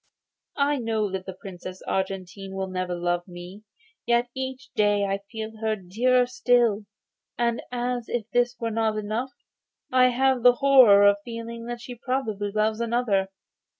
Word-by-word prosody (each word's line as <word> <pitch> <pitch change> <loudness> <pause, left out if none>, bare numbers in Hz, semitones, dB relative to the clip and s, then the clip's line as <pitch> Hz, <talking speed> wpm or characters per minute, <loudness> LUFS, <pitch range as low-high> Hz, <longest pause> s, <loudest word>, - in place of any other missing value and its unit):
I 285 0 +2
know 220 -3 -1
that 190 0 -5
the 190 -1 -7
Princess 185 -1 -9
Argentine 190 0 -4
will 190 0 -2
never 185 -1 -3
love 175 +1 -1
me, 180 +3 -10 0.5
yet 240 0 +2
each 260 -1 -6
day 205 -2 +2
I 195 0 -1
feel 220 -1 -6
her 220 0 -1
dearer 240 +7 +2
still. 240 -4 +2 0.5
And 235 -1 0
as 245 -1 -2
if 240 -3 -2
this 245 0 +2
were 230 -1 -2
not 220 -1 0
enough, 220 +5 -3 0.6
I 255 0 +5
have 260 0 +2
the 245 +1 +7
horror 250 -7 +6
of 200 0 +5
feeling 230 0 -7
that 240 0 -5
she 245 - -8
probably 235 -5 -2
loves 215 +2 0
another. 230 -5 +1
225 Hz, 155 wpm, -25 LUFS, 195-245 Hz, 0.6 s, the